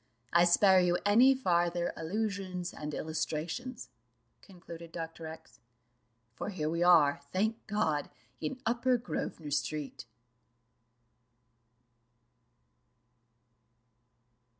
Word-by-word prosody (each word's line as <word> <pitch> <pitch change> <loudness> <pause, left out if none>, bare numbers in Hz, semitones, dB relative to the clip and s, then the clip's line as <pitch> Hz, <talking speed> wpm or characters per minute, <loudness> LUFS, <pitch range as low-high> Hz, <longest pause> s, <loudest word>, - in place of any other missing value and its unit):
I 170 +1 +6
spare 190 +2 +6
you 175 -1 +2
any 245 +6 +6
farther 175 -7 +1
allusion 190 0 -3
and 150 0 -5
illustrations," 160 - -4 0.5
concluded 170 -3 -11
Dr. 165 -1 -6
X, 160 0 -12 0.7
"for 125 - -5
here 160 -6 -2
we 170 +1 -2
are, 160 -6 +5
thank 220 +4 -1
God, 160 -9 0 0.3
in 155 +11 -4
Upper 245 +2 +2
Grosvenor 165 -9 -5
street." 145 0 -3
175 Hz, 85 wpm, -31 LUFS, 160-205 Hz, 0.7 s, I